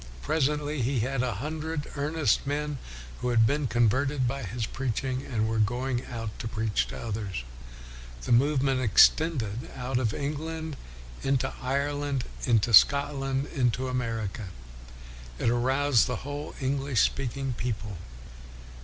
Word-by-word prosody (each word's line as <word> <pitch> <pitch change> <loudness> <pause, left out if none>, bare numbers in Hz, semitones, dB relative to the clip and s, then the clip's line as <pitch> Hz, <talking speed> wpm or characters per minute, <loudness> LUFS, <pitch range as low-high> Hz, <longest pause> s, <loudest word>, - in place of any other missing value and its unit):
Presently 150 - 0
he 125 0 +1
had 130 +2 0
a 125 -4 -1
hundred 155 +5 -3
earnest 150 0 +1
men 145 -1 -2 0.4
who 125 - -1
had 115 -2 +5
been 145 +3 +1
converted 125 +4 +2
by 135 +3 -2
his 115 +2 -3
preaching, 130 +1 -2
and 110 -4 -1
were 110 0 0
going 125 +3 0
out 115 -3 -6
to - - -3
preach 110 -1 0
to - - -7
others. 100 - -4 0.8
The - - -3
movement 135 +1 +3
extended 120 - +3
out 125 -1 -1
of 115 -4 +1
England 155 +3 -4 0.5
into 135 -1 0
Ireland, 140 0 -1 0.2
into 115 -2 +2
Scotland, 135 +3 +5
into 130 -1 +1
America. 115 -5 -3 0.9
It 115 - +1
aroused 130 +1 +3
the 125 0 -4
whole 145 +1 -5
English 135 -3 +1
speaking 135 0 0
people. 110 -5 -4
130 Hz, 130 wpm, -28 LUFS, 115-140 Hz, 0.9 s, had